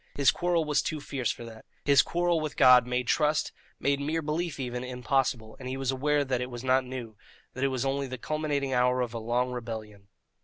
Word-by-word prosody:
His 140 -1 +5
quarrel 175 -2 0
was 150 -1 +2
too 155 - -3
fierce 135 -4 -3
for 120 - -8
that. 110 -1 -11 0.2
His 140 -2 +6
quarrel 175 -1 +1
with 155 -1 -4
God 125 -2 +7
made 125 0 -1
trust, 150 +4 +1 0.3
made 140 0 +1
mere 155 +3 -1
belief 155 0 -2
even, 125 -1 -3
impossible, 125 -2 -1
and 130 -1 -6
he 130 - -3
was 135 -1 0
aware 145 +2 +1
that 130 -2 -1
it 125 - -3
was 120 0 -7
not 130 0 +3
new, 125 -4 -7 0.4
that 130 - -6
this 135 - +3
was 130 0 -2
only 135 0 -1
the 130 0 -6
culminating 145 -1 -2
hour 125 0 +3
of 120 -2 -2
a 115 - -3
long 120 +3 0
rebellion. 110 -4 -7
130 Hz, 220 wpm, -28 LUFS, 125-145 Hz, 0.4 s, God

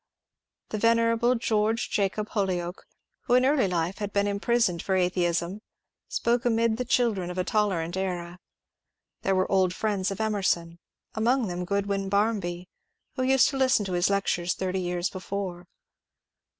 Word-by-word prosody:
The 215 - -3
venerable 230 +2 +3
George 225 0 0
Jacob 210 +1 -1
Holyoake, 180 -3 -2 0.4
who 245 - +3
in 255 +1 +4
early 270 -6 +3
life 175 +2 -2
had 205 -1 -3
been 200 0 +1
imprisoned 200 -3 +1
for 190 - -1
atheism, 180 +1 0 0.5
spoke 235 +1 0
amid 230 -2 +2
the 250 - -2
children 220 -8 +1
of 180 - -6
a 185 - +1
tolerant 185 -5 0
era. 180 -2 -3 0.8
There 195 - +1
were 185 0 0
old 185 -2 +2
friends 200 -3 -1
of 195 - -5
Emerson, 190 -6 0 0.3
among 235 0 +1
them 180 0 -3
Groodwyn 200 0 -1
Barmby, 195 -4 0 0.5
who - - -2
used 265 0 +4
to 275 - -4
listen 255 -5 +3
to 185 - -4
his 175 +1 +2
lectures 180 -3 0
thirty 190 0 -2
years 175 0 -1
before. 185 -2 -5
200 Hz, 150 wpm, -27 LUFS, 180-225 Hz, 0.8 s, in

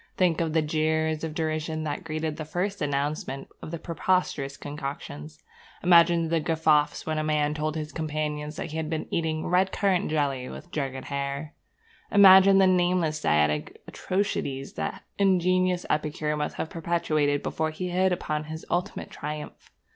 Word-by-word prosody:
Think 175 -3 +2
of 160 -2 -1
the 160 -1 +3
jeers 160 +1 0
of 160 -1 -4
derision 155 0 -2
that 155 +4 -3
greeted 155 -1 -3
the 155 - -4
first 185 +6 -3
announcement 140 -1 -2
of - - -7
these 165 0 -6
preposterous 165 -5 -1
concoctions! 145 +1 -7 0.4
Imagine 170 -1 +5
the 165 0 +2
guffaws 155 -2 +2
when 155 -1 -1
a - - -1
man 150 -1 +1
told 155 0 -2
his 155 -1 -4
companions 150 0 -3
that 160 - -5
he 160 - -4
had 160 -1 -2
been 160 -1 -2
eating 160 -1 -1
red 185 +2 +2
currant 195 -4 +1
jelly 140 -4 -1
with 175 - -10
jugged 135 -4 -3
hare! 140 +2 -4 0.6
Imagine 195 -1 +8
the 195 - +6
nameless 175 -4 +2
dietetic 75 0 +1
atrocities 140 -8 -2
that - - -2
that - - -14 0.2
ingenious 185 -1 +2
epicure 150 0 -1
must 150 0 -3
have 160 - -4
perpetrated 155 -4 0
before 160 0 -1
he 180 +3 -4
hit 185 +1 +2
upon 155 -3 -2
his 160 +1 -7
ultimate 175 +1 -2
triumph! 150 0 -7
155 Hz, 160 wpm, -26 LUFS, 150-175 Hz, 0.6 s, Imagine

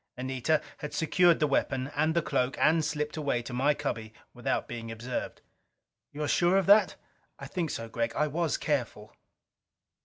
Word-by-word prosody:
Anita 130 +4 0 0.2
had 150 0 -6
secured 170 +1 +3
the 155 - +3
weapon 135 -1 0
and 155 +2 +1
the 170 - +2
cloak 125 +1 0
and 160 +1 +3
slipped 150 0 -2
away 140 -5 -1
to 120 - -7
my 140 +4 +2
cubby 110 -7 -4 0.2
without - - -2
being 115 -1 -6
observed. 120 +3 -5 0.7
"You're 150 +1 -3
sure 175 +5 +3
of 195 - +2
that?" 205 +3 +5 0.4
"I - - -8
think 170 -4 -3
so, 115 - -4
Gregg. 115 +1 -2
I 150 - +2
was 160 +2 -1
careful." 120 -7 -3
145 Hz, 165 wpm, -29 LUFS, 125-160 Hz, 0.7 s, that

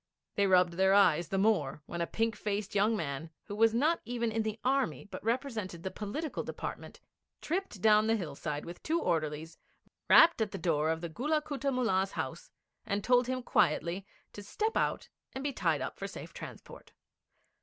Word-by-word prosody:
They 200 -1 +2
rubbed 180 -2 +4
their 190 +2 +4
eyes 175 -4 +4
the 195 - -2
more 190 -9 +1
when 170 +2 -5
a 170 - 0
pink 225 0 0
faced 205 -1 -3
young 210 +2 +3
man, 150 -2 -4
who 205 - -7
was 225 +1 +5
not 300 +9 +2
even 235 -1 -2
in 225 +1 0
the 220 0 -3
Army, 270 -2 0
but 205 - -9
represented 225 -7 -2
the 190 - -3
Political 280 +10 -4
Department, - - -6 0.4
tripped 345 - -3
down 215 0 +5
the 225 - +3
hillside 150 -5 -4
with 170 +1 -9
two 330 +2 0
orderlies, 160 - -2 0.5
rapped 330 -7 +7
at 215 - +1
the 195 - -6
door 160 -3 +1
of 160 0 -1
the 170 - -4
Gulla 295 - 0
Kutta 285 -2 -3
Mullah's 195 -7 +1
house, - - -5 0.3
and 200 0 -2
told 245 +1 +4
him 255 0 -2
quietly 185 -3 +1 0.3
to 205 - -8
step 435 - -2
out - - 0 0.3
and 265 - -5
be 285 -1 -1
tied - - +1
up - - -5
for - - -3
safe - - -9
transport. - - -10
210 Hz, 185 wpm, -31 LUFS, 175-250 Hz, 0.5 s, rapped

